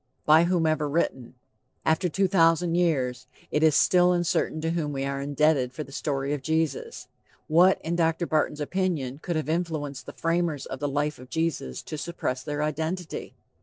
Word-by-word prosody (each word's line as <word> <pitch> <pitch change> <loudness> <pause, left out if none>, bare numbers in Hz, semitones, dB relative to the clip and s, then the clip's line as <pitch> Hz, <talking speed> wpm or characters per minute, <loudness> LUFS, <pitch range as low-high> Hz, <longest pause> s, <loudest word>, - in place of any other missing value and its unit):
By 160 +2 +6
whomever 160 -4 +1
written! 130 -5 -1 0.5
After 160 +3 +2
two 195 +4 +1
thousand 165 -1 +3
years, 135 -8 0 0.2
it 150 - +1
is 160 -2 +5
still 180 0 +5
uncertain 175 -2 0
to 165 +1 -1
whom 155 -4 -2
we 135 0 -2
are 140 0 -2
indebted 140 -2 +1
for 155 - -5
the 140 - -14
story 140 0 -2
of 145 - -3
Jesus. 160 -1 -2 0.4
What, 175 +4 +5
in 165 +2 -1
Dr. 165 0 +1
Barton's 155 -1 0
opinion, 150 -6 -2
could 170 +1 -3
have 155 -1 -2
influenced 155 -5 -3
the - - -7
framers 165 -4 -1
of - - -6
the 145 0 -1
life 145 +1 -1
of 125 0 -12
Jesus 160 - -2
to 155 - -6
suppress 130 -7 -3
their 150 0 -3
identity? 160 +4 -3
155 Hz, 175 wpm, -26 LUFS, 140-170 Hz, 0.5 s, By